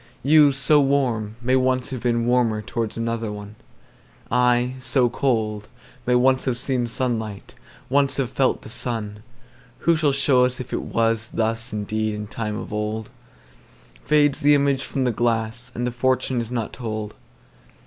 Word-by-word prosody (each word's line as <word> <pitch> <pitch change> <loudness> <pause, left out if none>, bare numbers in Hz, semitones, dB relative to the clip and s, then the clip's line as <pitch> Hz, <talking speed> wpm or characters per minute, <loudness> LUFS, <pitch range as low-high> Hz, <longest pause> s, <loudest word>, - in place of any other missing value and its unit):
You, 150 0 +6
so 135 +2 +4
warm, 125 -6 0
may 130 +2 +2
once 130 0 +1
have 130 -3 -4
beenWarmer 115 -2 +1
towards 115 -1 -3
another 115 -1 -2
one:I, 120 +4 -3
so 130 -1 +2
cold, 110 -6 -1 0.4
may 125 - +3
once 130 +1 +3
have 130 -2 0
seenSunlight, 120 -4 -2 0.3
once 135 0 +2
have 130 -3 -1
felt 135 -1 +1
the - - -10
sun:Who 110 +8 -4
shall 155 -3 +2
show 135 -2 +3
us 125 0 -2
if 125 -1 -7
it - - -4
wasThus 115 0 0
indeed 110 +1 -2
in 105 0 -5
time 105 0 -4
of - - -7
old? 105 +1 -3 0.9
Fades 145 -2 +3
the 145 +1 +5
image 140 -1 +1
from 135 - -2
the 125 - +2
glass, 115 +1 -1
And 120 - -2
the 125 - -1
fortune 130 0 0
is 115 - -6
not 120 -3 -3
told. 110 -3 -5
120 Hz, 150 wpm, -23 LUFS, 110-130 Hz, 0.9 s, You